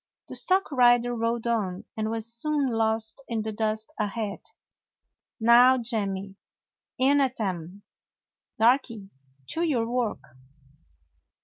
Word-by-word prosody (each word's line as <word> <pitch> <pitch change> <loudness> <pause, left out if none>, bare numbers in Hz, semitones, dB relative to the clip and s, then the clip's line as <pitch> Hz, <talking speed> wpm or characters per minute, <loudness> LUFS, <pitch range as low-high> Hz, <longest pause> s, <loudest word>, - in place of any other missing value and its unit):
The - - -6
stock 380 -2 +1
rider 245 -2 +4
rode 230 0 -1
on, 205 -6 -1
and 220 0 -2
was 225 0 -3
soon 295 +4 0
lost 225 0 0
in 225 -2 -2
the 220 - -3
dust 215 0 -2
ahead. 210 -1 -3 1.0
"Now, 240 +3 +6
Jemmy, 200 -5 -3 0.6
in 280 +2 +3
at 260 -2 -1
'em! 185 -1 -4 0.7
Darky, 230 -4 +1 0.4
to 330 - -2
your 265 -9 +1
work!" 240 -2 -2
230 Hz, 115 wpm, -26 LUFS, 215-245 Hz, 1.0 s, Now